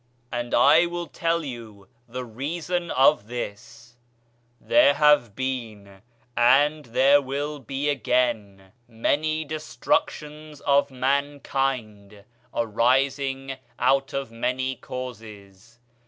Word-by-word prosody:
And 120 0 -2
I 160 +4 +6
will 175 0 -4
tell 165 0 -1
you 115 -6 -9 0.2
the 125 +2 -6
reason 165 +8 -3
of 130 -4 +3
this: 120 0 -8 0.6
there 140 - +4
have 145 -8 +4
been, 110 -7 -5 0.3
and 145 +5 +4
there 135 +5 +4
will 145 +2 -4
be 135 +3 -4
again, 115 -7 -1 0.2
many 155 +7 -1
destructions 155 - -3
of 140 0 +3
mankind 130 -6 -2 0.3
arising 135 +4 0 0.2
out 135 +2 +2
of 135 -3 -4
many 130 +3 -2
causes. 115 -4 -10
130 Hz, 95 wpm, -24 LUFS, 115-145 Hz, 0.6 s, I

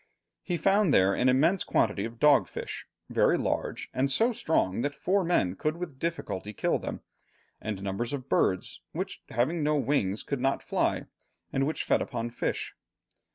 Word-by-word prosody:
He 175 -2 -2
found 195 +1 +3
there 95 -5 +5
an 125 - +3
immense 160 +9 +3
quantity 105 -2 +1
of 115 +1 -7
dog 145 +2 +5
fish, - - -6 0.2
very - - +4
large, - - -2
and 130 +2 +1
so 230 - +2
strong 115 - +1
that 145 +2 -2
four 195 +1 +1
men 100 - +1
could 155 - -1
with 165 -7 -6
difficulty 105 - -3
kill - - 0
them, - - -5 0.6
and 105 -3 -4
numbers 100 +5 -2
of 135 -2 -4
birds, 95 -1 0
which, - - -4
having 145 +8 0
no 150 +1 +2
wings, 135 -9 0
could 140 -3 -3
not 135 +1 +1
fly, - - 0 0.5
and 135 +1 +1
which 155 - -2
fed - - +2
upon 120 -2 -3
fish. 115 - -2
135 Hz, 170 wpm, -28 LUFS, 110-160 Hz, 0.6 s, there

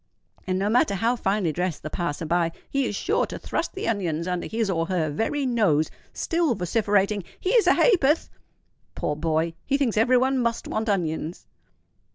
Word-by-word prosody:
"—and, 185 0 0
no 195 +2 0
matter 210 -2 +3
how 230 +6 +1
finely 195 -6 0
dressed 180 -1 -2
the 155 - -4
passer 165 -2 -3
by, 170 +1 +1 0.2
he 275 -2 +1
is - - -3
sure 415 - 0
to - - -6
thrust - - -3
the 385 - -3
onions 175 -7 -1
under 180 -1 -2
his 225 -1 -1
or 165 -3 0
her 170 -5 0
very 270 - -1
nose, 205 - +2 0.2
still 330 -7 0
vociferating, 200 +1 +1 0.2
"Here's 430 +4 +3
a - - +6
ha'porth!" 335 - +3 0.6
Poor 150 - -2
boy! 160 +1 0
he 275 - +1
thinks 255 -7 0
every 250 +3 +4
one 260 +1 +2
must 235 -1 -1
want 220 +1 -2
onions! 165 -3 -2
200 Hz, 180 wpm, -25 LUFS, 170-245 Hz, 0.6 s, a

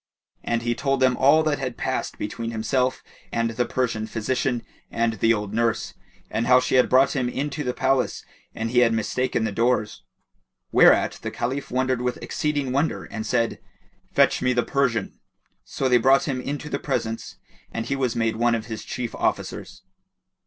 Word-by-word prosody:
And 115 0 -1
he 120 0 +1
told 135 +1 0
him 130 -1 +4
all 145 +5 +5
that 155 -2 0
had 125 -3 -4
passed - - -2
between 115 +2 -4
himself 125 +3 -1 0.3
and 115 0 0
the 120 +2 -1
Persian 115 -4 -1
physician 120 +2 -1 0.3
and 115 0 0
the 115 - +4
old 105 -2 -1
nurse, 115 0 0 0.4
and 115 - -1
how 125 0 +7
she 130 - -2
had 125 -1 +4
brought 130 +3 +4
him 125 -3 0
into 145 +4 -3
the 125 - -1
palace 130 -1 0 0.3
and 115 0 -3
he 125 - +4
had 115 -2 +4
mistaken 115 +2 -1
the 110 - -1
doors; 115 0 0 0.7
whereat - - +5
the - - -3
Caliph 135 +4 -3
wondered 130 0 0
with 125 0 -1
exceeding 145 -5 -1
wonder 140 +5 0
and 110 -1 -6
said, 115 -2 0 0.5
"Fetch - - +3
me 125 0 +2
the 120 -1 +2
Persian." 125 -7 -1 0.5
So 135 - -2
they 125 -1 +5
brought 135 +5 +4
him 130 -3 -2
into 145 +3 -4
the 140 - -2
presence 115 -5 -3 0.4
and 115 - -3
he 135 - -1
was 130 -4 -1
made 115 -1 0
one 120 0 +3
of 115 -1 -4
his 110 -2 -6
chief 125 -2 -4
officers. - - -3
125 Hz, 180 wpm, -24 LUFS, 115-130 Hz, 0.7 s, how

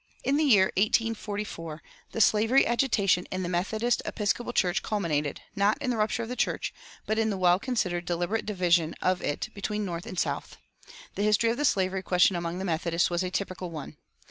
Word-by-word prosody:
In 275 - +1
the 310 - +2
year 205 -10 +5
1844 205 -6 -1 0.3
the 225 - -1
slavery 225 +6 +4
agitation 210 -7 +2
in 185 0 -3
the - - -2
Methodist 215 +7 0
Episcopal 230 +3 -1
Church 180 -5 +1
culminated, 155 -9 -1
not 200 +2 +2
in 255 - -1
the 235 - -1
rupture 215 +2 0
of 225 - -7
the 250 - -3
church, - - -1 0.3
but 215 +1 0
in 220 0 +2
the 200 - -2
well 180 0 +4
considered, 195 -8 -1
deliberate 175 +6 -1
division 175 -5 +2
of 185 -1 +1
it 145 - -2
between 210 +1 -3
North 170 -2 -5
and 185 - -7
South. - - -3 0.6
The - - -4
history 210 +2 +3
of 235 - -3
the 295 - 0
slavery 190 -3 +1
question 180 0 +3
among 170 0 -3
the 190 - -4
Methodists 170 0 0
was 175 0 0
a 185 - -1
typical 185 -1 -4
one. 155 -4 -8
195 Hz, 195 wpm, -27 LUFS, 175-220 Hz, 0.6 s, year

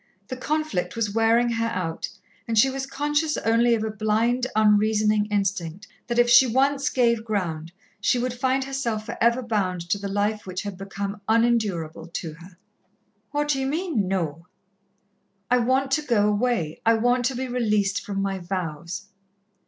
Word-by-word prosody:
The 255 - -3
conflict 255 -10 -2
was 215 -3 -1
wearing 230 +2 +3
her 230 -1 0
out, 180 -6 -3 0.4
and 225 -1 -1
she 265 +5 +5
was 270 0 -4
conscious 295 +2 0
only 230 +1 +3
of 220 - -2
a 220 - -2
blind, 220 +4 +1
unreasoning 215 0 +3
instinct 195 -2 -2 0.2
that 240 0 -2
if 240 0 +5
she 255 +2 +7
once 275 +4 +2
gave 235 -3 +2
ground, 170 -7 -3 0.3
she - - +2
would 245 0 -1
find 260 +2 0
herself 245 -5 -3
for - - -5
ever 235 +2 +3
bound 185 -7 -1
to 200 - +1
the 200 - -4
life 205 +1 -1
which 185 0 -4
had 200 -2 -5
become 200 +2 -5
unendurable 210 -9 +1
to 165 -2 -5
her. 170 +2 -15 0.7
"What 295 0 -1
d'ye 270 -2 +1
mean, 295 - -1
No?" 170 -3 -2 1.0
"I 250 - +5
want 260 +3 +1
to 305 - +2
go 230 -8 +2
away. 210 -7 0
I 230 0 +4
want 245 +2 +2
to 260 +1 0
be 260 +1 -3
released 215 -5 0
from 195 -1 -3
my 195 -1 -2
vows." 175 -1 -4
220 Hz, 170 wpm, -24 LUFS, 195-250 Hz, 1.0 s, she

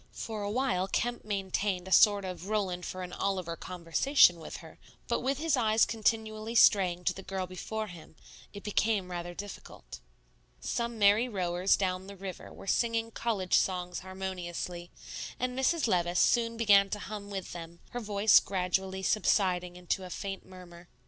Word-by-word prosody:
For 220 -2 -5
a 205 - -2
while 225 -5 0
Kemp 240 +4 -2
maintained 195 -2 -2
a - - -8
sort 200 +2 +6
of 185 0 -6
Roland 190 -5 -1
for 185 0 -5
an 180 - -7
Oliver 185 -4 -2
conversation 175 - +3
with 160 - -7
her; - - -13 0.3
but - - 0
with 270 +1 -1
his 315 0 +1
eyes 220 -3 +3
continually 220 0 -1
straying 185 -6 +5
to - - +1
the 190 - -9
girl 190 -1 -4
before 215 +4 -5
him, 175 -5 -12 0.4
it 200 - -10
became 210 -3 0
rather 175 0 -5
difficult. 205 +2 -9 0.6
Some 235 -1 -3
merry 210 +4 +4
rowers 180 -2 +1
down 185 -1 -2
the 200 - -9
river 190 -1 -8
were - - -12
singing 230 +2 0
college 210 -6 -2
songs 180 -1 +1
harmoniously; 180 -2 -5 0.5
and 250 0 -1
Mrs. 280 +5 +2
Levice 175 -3 +1
soon 230 -1 +3
began 200 -3 +5
to 210 - -2
hum 205 0 -7
with 195 -2 -5
them, 170 0 -9
her 245 - -3
voice 210 -1 +5
gradually 190 0 -2
subsiding 180 -4 +1
into 180 +1 -2
a 185 - -8
faint 195 +1 -5
murmur. 180 -2 -13
195 Hz, 165 wpm, -30 LUFS, 180-215 Hz, 0.6 s, sort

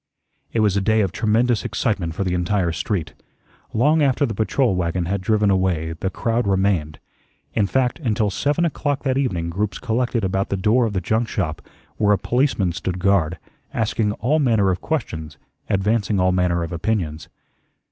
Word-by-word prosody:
It 115 - +1
was 105 -3 +2
a 100 - +2
day 110 +2 +3
of 95 -4 0
tremendous 115 +3 +1
excitement 90 -7 -1
for - - -1
the 90 -2 -1
entire 90 0 0
street. 85 +1 -3 0.6
Long 150 +8 +3
after 140 0 +3
the 115 - -3
patrol 115 +1 +1
wagon 85 0 -1
had 100 +2 -2
driven 105 +1 +2
away, 90 -4 0
the 95 - -1
crowd 115 +4 -1
remained. 95 -6 +1 0.6
In 105 -3 +2
fact, 125 +2 0
until 110 -3 0
seven 145 - +1
o'clock 145 -3 -1
that 130 -2 +1
evening 85 -11 -1
groups 100 +4 -2
collected 120 0 -1
about 95 +1 0
the 100 - -1
door 115 +5 +3
of 105 - -4
the 95 - -1
junk 110 +6 0
shop, - - -2 0.4
where 105 -1 +3
a - - +3
policeman 120 -4 +1
stood 90 +2 -3
guard, 90 -3 +2 0.4
asking 110 -1 0
all 140 +9 +1
manner 110 -9 +3
of 90 - -3
questions, 80 - -3 0.3
advancing 105 +1 +1
all 90 0 +3
manner 90 -2 +1
of 85 - -5
opinions. 85 -3 -2
100 Hz, 175 wpm, -22 LUFS, 90-115 Hz, 0.6 s, day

